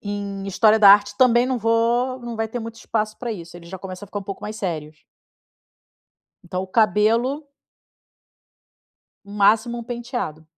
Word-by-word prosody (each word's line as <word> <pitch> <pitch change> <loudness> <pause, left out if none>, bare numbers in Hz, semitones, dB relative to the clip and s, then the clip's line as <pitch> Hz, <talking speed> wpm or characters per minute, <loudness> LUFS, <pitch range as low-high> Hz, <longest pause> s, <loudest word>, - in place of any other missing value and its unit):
em 200 -1 -5
história 215 +3 +4
da 200 -2 +8
arte, 205 0 +4
também 245 -2 +4
não 255 -2 -1
vou 235 +3 +1
não 240 -1 -7
vai 225 0 -1
ter 240 +2 -5
muito 230 0 -8
espaço 215 -1 -3
pra 240 -2 -4
isso, 170 -3 -9
ele 170 -1 -13
já 190 +2 -7
começa 190 +1 -8
a - - -14
ficar 205 +1 -5
pouco 195 -1 -7
mais 215 +1 -5
sérios. 155 -5 -5 1.4
Então 180 +1 -4
o 190 - -9
cabelo 225 +7 +2 1.8
no 200 - -12
máximo 220 +4 +3
um - - -7
penteado. 240 - -5
215 Hz, 165 wpm, -22 LUFS, 195-235 Hz, 1.8 s, da